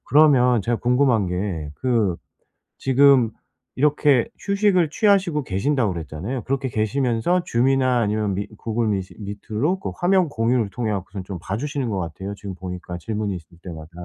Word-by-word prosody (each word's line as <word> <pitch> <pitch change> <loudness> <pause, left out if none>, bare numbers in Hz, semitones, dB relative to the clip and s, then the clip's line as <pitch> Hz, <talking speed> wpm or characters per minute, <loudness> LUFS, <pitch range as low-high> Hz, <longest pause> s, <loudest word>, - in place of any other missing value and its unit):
그러면 130 -6 +5
제가 120 +4 0
궁금한 125 -4 +2
게 90 -4 -3
그 115 -8 +1 0.6
지금 135 -3 +4 0.5
이렇게 145 -3 +3
휴식을 200 -4 +2
취하시고 190 -5 +2
계신다고 110 +1 0
그랬잖아요. 85 - -5
그렇게 135 0 -1
계시면서 120 - +1
줌이나 130 0 +2
아니면 105 -2 0
미 100 +2 -3
구글 115 0 -1
미시 95 -3 -2
미트로 110 - -2
그 - - -4
화면 185 -1 +3
공유를 115 -3 +1
통해 110 0 -2
갖고선 95 -1 -5
좀 95 -2 -6
봐주시는 130 - -3
것 100 - -2
같아요. 90 +4 -5
지금 100 -1 -7
보니까 90 -1 -7
질문이 105 +1 -3
있을 85 0 -14
때마다. 80 -4 -9
115 Hz, 365 characters per minute, -22 LUFS, 100-135 Hz, 0.6 s, 그러면